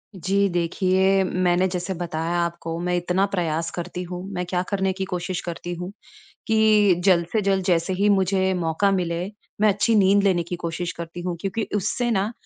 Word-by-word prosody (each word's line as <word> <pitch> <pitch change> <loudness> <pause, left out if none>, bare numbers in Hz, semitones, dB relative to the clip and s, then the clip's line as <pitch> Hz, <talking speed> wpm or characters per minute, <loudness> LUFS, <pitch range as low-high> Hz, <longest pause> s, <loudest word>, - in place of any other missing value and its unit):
जी, 195 +3 +1
देखिए, 185 +2 +2
मैंने 180 0 +1
जैसे 180 +1 -3
बताया 170 -1 -2
आपको, 170 -1 -3
मैं 180 +1 -1
इतना 180 +2 +1
प्रयास 165 -3 -1
करती 180 +1 -5
हूँ। 180 0 -6
मैं 180 -1 -2
क्या 180 0 -1
करने 190 -2 0
की 190 0 -3
कोशिश 180 0 -3
करती 175 0 -5
हूँ 180 +2 -6 0.6
कि 215 -3 +4
जल्द 175 -3 +4
से 220 - +2
जल्द 195 -1 +1
जैसे 175 0 +1
ही 200 +3 +2
मुझे 190 -1 +2
मौका 175 +3 +1
मिले, 175 -2 -1 0.4
मैं 215 - +5
अच्छी 210 +3 +2
नींद 200 -1 +4
लेने 185 -3 +3
की 175 +1 -5
कोशिश 170 0 -4
करती 170 +1 -7
हूँ 175 -1 -3
क्योंकि 200 +4 -2
उससे 240 +5 -1
ना 210 0 0
180 Hz, 185 wpm, -23 LUFS, 175-195 Hz, 0.6 s, मैं